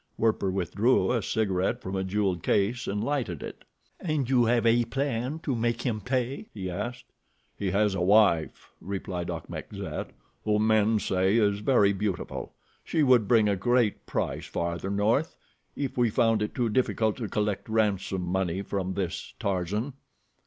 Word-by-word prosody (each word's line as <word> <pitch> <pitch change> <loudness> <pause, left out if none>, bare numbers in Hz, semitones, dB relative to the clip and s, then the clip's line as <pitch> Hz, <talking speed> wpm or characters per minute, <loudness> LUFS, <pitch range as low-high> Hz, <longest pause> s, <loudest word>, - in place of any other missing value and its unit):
Werper 110 -3 +1
withdrew 100 +8 +2
a 120 -2 +1
cigaret 100 +2 0
from 95 -5 -5
a 95 - 0
jeweled 95 -2 0
case 115 +10 +1
and 105 +1 -1
lighted 115 - -2
it. - - -8 0.4
"And 155 -7 -1
you 125 -2 +4
have 120 0 +2
a 120 +1 +4
plan 130 +2 -2
to 135 - -1
make 115 +1 -1
him 110 -5 -1
pay?" 130 - -2
he 95 -3 -4
asked. 120 +6 -5 0.5
"He 100 - -2
has 100 +1 +2
a 95 - -2
wife," 95 -4 +3
replied 90 -2 -4
Achmet 85 -2 -6
Zek, - - -5 0.3
"whom 105 0 +2
men 110 0 +3
say 95 +1 +1
is 100 -2 +2
very 105 -3 +3
beautiful. 100 -2 -4 0.3
She 160 - +1
would 125 -6 +5
bring 110 -2 +4
a 100 - +2
great 120 +2 +1
price - - -2
farther 85 +2 -3
north, 110 +10 +1 0.4
if 140 -2 -3
we 120 -1 +4
found 115 -1 +2
it 105 - -3
too 120 -4 +1
difficult 110 -2 +1
to 115 -5 -4
collect 105 0 -1
ransom 100 -4 0
money 95 +1 -1
from 95 -2 -3
this 95 -1 -4
Tarzan." 100 +5 -2
105 Hz, 165 wpm, -27 LUFS, 95-120 Hz, 0.5 s, would